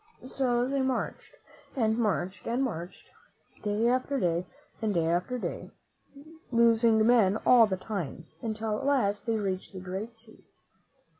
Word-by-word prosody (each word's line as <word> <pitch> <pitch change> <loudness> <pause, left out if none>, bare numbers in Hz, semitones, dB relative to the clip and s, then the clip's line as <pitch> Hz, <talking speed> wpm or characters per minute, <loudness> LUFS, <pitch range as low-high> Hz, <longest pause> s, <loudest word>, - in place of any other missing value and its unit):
So 250 -2 0
they 275 0 0
marched, 260 -1 -3 0.4
and 220 -4 +2
marched, 205 -4 -1
and 240 +3 0
marched, 175 -8 -6 0.5
day 210 +2 0
after 255 +3 +1
day, 175 -1 0 0.3
and 215 -3 0
day 165 -1 +2
after 175 +9 0
day, - - -5 0.8
losing 230 -2 +4
men 220 -4 +4
all 235 -3 +7
the 190 -2 -2
time, 180 -5 -5 0.2
until 220 -1 -2
at 270 - -5
last 235 -7 +1
they 230 - +1
reached 190 -3 -3
the 190 - -6
great 190 +5 -6
sea. 225 -1 -18
220 Hz, 145 wpm, -29 LUFS, 190-240 Hz, 0.8 s, all